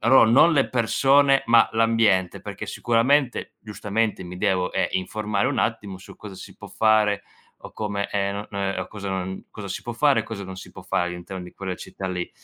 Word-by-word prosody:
allora 115 -1 +6
non 155 +7 +6
le 140 -4 +2
persone, 135 +3 +3
ma 115 0 +5
l'ambiente, 110 -5 +2
perché - - -7
sicuramente, 125 +3 +1
giustamente, 105 -1 -2
mi 90 +1 -8
devo, 95 -2 0
ehm, - - +1
informare 100 +2 -1
un - - -2
attimo 105 -5 -2
su 95 - -14
cosa 105 -2 -10
si 95 - -11
può - - -11
fare 105 -2 +2 0.4
o - - -11
come, 100 -1 -3
ehm, 100 -1 -1
no 100 +1 -5
non 100 -1 -4
è - - -3
o 90 - -4
cosa 100 -2 -7
non 95 0 -4
cosa 105 -2 -8
si 95 - -4
può 120 - -5
fare 140 +3 +3
e - - -3
cosa 100 -3 -6
non 95 0 -8
si - - -10
può - - -12
fare 90 - -1
all'interno 90 +1 -7
di 90 - -11
quella 95 -2 -4
città 95 - -8
lì. 90 -1 -4
105 Hz, 210 wpm, -24 LUFS, 95-115 Hz, 0.4 s, allora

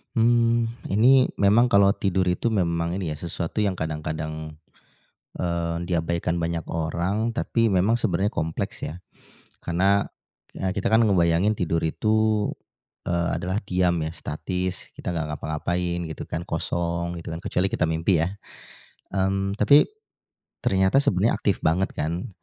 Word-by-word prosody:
Mmm. 115 0 +2
Ini 125 +6 +5
memang 105 +5 +4
kalau 100 -4 +5
tidur 95 -2 0
itu, 90 - -1
memang 85 -5 0
ini 90 -5 -3
ya, 75 - -6
sesuatu 85 +3 -4
yang 100 -3 +1
kadang-kadang, 80 -1 -4 0.8
eee, 85 -1 -2
diabaikan 85 0 0
banyak 85 0 -1
orang, 90 +8 -1
tapi 115 -2 +1
memang 100 +6 +3
sebenarnya 100 -3 0
kompleks, 80 -5 -3
ya. 90 +3 -7 0.6
Karena, 95 +4 +2 0.5
ya 95 -1 -3
kita 100 - -1
kan 115 +1 +5
ngebayangin 90 +2 +3
tidur 85 -3 0
itu, 110 +5 +1 0.6
eee, 85 0 0
adalah 95 +4 -2
diam, 90 -2 +1
ya, 80 - -3
statis, 90 +3 -4
kita 90 - -5
nggak 80 -1 -1
ngapa-ngapain, 85 +3 -2
gitu 80 - -7
kan, 85 - -4
kosong, 85 0 -2
gitu 85 - -6
kan. 80 - -5
Kecuali 90 +2 0
kita 80 - +1
mimpi, 80 +2 +1
ya? 90 +5 -1 0.8
Mmm. 95 +1 0
Tapi, 140 +9 +6 0.7
ternyata 95 +7 +3
sebenarnya 110 - +2
aktif 100 -3 -1
banget, 90 +4 +1
kan, 85 +4 -2
90 Hz, 140 wpm, -24 LUFS, 85-100 Hz, 0.8 s, Tapi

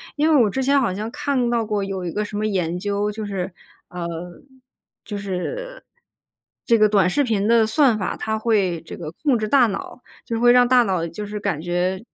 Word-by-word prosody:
因 300 +2 +2
为 250 - +6
我 210 - +2
之 265 +5 -2
前 280 +1 +3
好 235 - +1
像 215 +3 -4
看 275 -4 -1
到 230 -1 +1
过 210 -2 -2
有 195 -2 -4
一 170 - -3
个 210 0 -2
什 205 - -8
么 215 +1 0
研 180 -4 -1
究， 205 +1 -1
就 215 +1 -6
是， 195 -3 -4 0.4
呃， 175 -1 -5 1.0
就 210 - -5
是， 485 - -5 0.8
这 230 -2 +3
个 215 0 +5
短 195 -3 +3
视 285 +9 +1
频 215 -3 0
的 230 -1 +5
算 250 -1 +3
法 190 - -2
它 220 0 -2
会 200 -7 +1
这 - - -9
个 155 -3 -6
控 275 -6 +3
制 215 - -2
大 260 0 +5
脑， 205 +4 -6 0.2
就 230 -1 -3
会 240 +1 +6
让 245 0 +5
大 250 -1 +5
脑 185 -4 -1
就 205 +6 -6
是 210 0 -5
感 155 -6 -2
觉 180 +3 -1
210 Hz, 230 characters per minute, -22 LUFS, 190-240 Hz, 1.0 s, 为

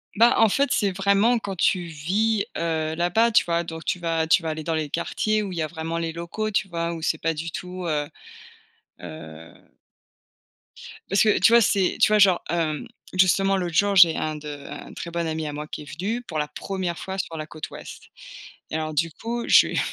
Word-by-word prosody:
Bah, 235 +3 +5
en 225 -2 +6
fait, 280 +5 +1
c'est 205 -9 +2
vraiment 200 +5 +3
quand 200 -3 -5
tu 180 +1 +1
vis, 200 +7 0
heu, 160 -1 -1
là-bas, 200 +8 +2
tu - - +4
vois 170 0 0
donc 160 -1 -8
tu 180 - -1
vas 165 -1 0
tu 160 - +4
vas 160 - -3
aller 155 0 -4
dans 165 - -2
les 155 -2 -2
quartiers 215 +6 -1
où 195 - -5
il 175 - -6
y - - -1
a 155 - -1
vraiment 165 +1 -4
les 165 -1 -2
locaux, 170 +6 -4
tu 195 -2 0
vois, 170 0 -2
où 165 - -7
c'est 160 - 0
pas 165 0 0
du 160 +1 -5
tout, 180 +2 -6
heu, 150 -2 -1 0.9
heu 80 -1 -10 1.6
Parce 195 - +3
que, 215 - +3
tu 230 - +5
vois, 235 - +7
c'est 195 -3 +2
tu - - +5
vois, 210 - +4
genre, 190 -3 +5
hem, 160 -3 -1 0.3
justement, 190 +1 +3
l'autre 175 -3 -2
jour, 200 +1 +3
j'ai 170 -3 +7
un 155 0 -2
de 150 0 -8 0.2
un - - -9
très 170 - -6
bon 170 0 -2
ami 160 -1 -3
à 145 - -5
moi 150 +1 -5
qui 150 - -7
est - - -14
venu 220 +7 -2
pour 160 -8 -6
la 150 0 -1
1re 180 +1 -4
fois 190 0 -5
sur 165 -3 -4
la 155 - -4
côte 155 0 -8
ouest - - -11 0.6
et - - -4
alors 155 -1 -3
du 165 +2 0
coup 235 +6 -4
je - - +7
lui - - -6
ai - - +2
170 Hz, 230 wpm, -24 LUFS, 160-195 Hz, 1.6 s, vois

